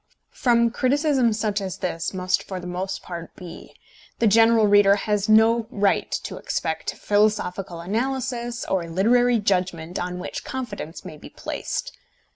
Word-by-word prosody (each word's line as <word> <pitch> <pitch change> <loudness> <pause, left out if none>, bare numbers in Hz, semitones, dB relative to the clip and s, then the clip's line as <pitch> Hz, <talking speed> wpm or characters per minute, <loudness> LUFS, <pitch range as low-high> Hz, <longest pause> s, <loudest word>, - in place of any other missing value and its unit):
From 235 -2 +2
criticism 265 -1 +2
such 210 -1 -1
as 190 -2 -4
this 165 -3 -3
must 185 -1 0
for 190 -2 -6
the 180 - -9
most 180 +2 -4
part 170 -2 -8
be, 175 -2 -11 0.4
the 235 - +1
general 225 +1 +5
reader 205 -1 +6
has 210 0 -1
no 220 +1 +5
right 205 -5 +1
to - - -6
expect - - -3
philosophical 200 -4 0
analysis, 240 +3 -2
or 175 -3 -1
literary 240 +7 +3
judgment 180 -5 -1
on 180 0 -3
which 180 - -6
confidence 210 -12 -6
may 160 -4 -8
be - - -12
placed. - - -5
205 Hz, 145 wpm, -23 LUFS, 180-235 Hz, 0.4 s, reader